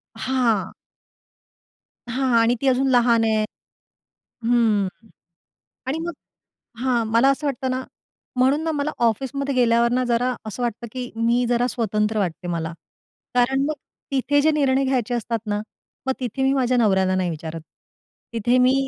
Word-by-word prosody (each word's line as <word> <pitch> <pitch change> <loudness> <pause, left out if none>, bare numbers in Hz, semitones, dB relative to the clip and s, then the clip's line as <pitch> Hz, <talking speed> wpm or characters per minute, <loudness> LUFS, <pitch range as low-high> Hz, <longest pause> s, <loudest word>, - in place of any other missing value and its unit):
हां. 235 -8 0 1.4
हां. 260 0 0
आणि 235 +2 +3
ती 275 - 0
अजून 265 +1 +3
लहान 235 -2 +4
आहे 220 -1 +2 1.0
हं, 225 -5 +3 1.0
आणि 300 +5 -1
मग 345 - -3 0.7
हां, 245 -3 +2
मला 230 +5 +4
असं 290 +2 -1
वाटतं 265 -1 -1
ना 255 0 -1 0.5
म्हणून 270 +5 +3
ना 325 - 0
मला 295 0 -1 0.2
ऑफिसमध्ये 275 +4 -1
गेल्यावर 235 -1 +3
ना 255 0 +2
जरा 245 +1 +1
असं 215 +4 -5
वाटतं, 235 0 -2
की 250 -1 -5
मी 235 +2 +2
जरा 245 0 +2
स्वतंत्र 215 -2 0
वाटते 175 -2 -2
मला. 165 -1 -2 0.6
कारण 265 +3 +2
मग 310 - -1 0.4
तिथे 275 +2 +2
जे 315 +2 +4
निर्णय 275 -3 +2
घ्यायचे 250 -2 0
असतात 230 0 -1
ना, 205 0 -1 0.5
मग 265 - +2
तिथे 255 +2 -3
मी 270 0 +3
माझ्या 255 -2 +2
नवऱ्याला 190 -5 +3
नाही 185 -2 0
विचारत. 160 0 -6 0.7
तिथे 240 +3 +2
मी 255 +1 +5
245 Hz, 150 wpm, -23 LUFS, 225-265 Hz, 1.4 s, मी